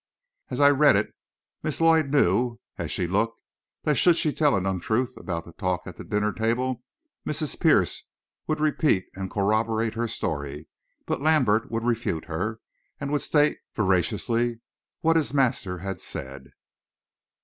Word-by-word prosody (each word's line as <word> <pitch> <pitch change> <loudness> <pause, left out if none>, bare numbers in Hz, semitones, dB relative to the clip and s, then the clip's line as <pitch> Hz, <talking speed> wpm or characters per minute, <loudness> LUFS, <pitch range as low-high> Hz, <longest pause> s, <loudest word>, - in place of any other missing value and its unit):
As - - -4
I 145 0 +7
read 145 +1 +5
it, - - 0 0.5
Miss 155 -1 -3
Lloyd 165 -2 +4
knew, 120 -3 +2 0.2
as - - -4
she 90 - -1
looked, 105 +6 0 0.4
that 150 - +2
should 175 -2 +5
she 150 - +1
tell 150 -2 +3
an 95 -1 -1
untruth 110 +7 -1
about 85 -3 -5
that 85 - -15
talk 90 -3 -1
at - - -9
the - - -7
dinner 105 0 0
table, 120 +3 -1 0.4
Mrs. 150 0 -3
Pierce - - +3 0.5
would 155 0 0
repeat 150 - +2
and 95 0 -5
corroborate 110 +2 +1
her 115 +1 -1
story; 75 -8 -4 0.4
but - - -2
Lambert 130 -8 +3
would 115 0 -2
refute 115 -9 -1
her, 110 +7 -3 0.4
and 140 0 -4
would 145 - +1
state 150 -1 +2 0.2
veraciously 110 +4 0 0.4
what 165 0 +4
his 145 -2 -1
master 115 -9 +1
had 95 +2 -5
said. 65 0 -7
115 Hz, 155 wpm, -26 LUFS, 95-145 Hz, 0.5 s, I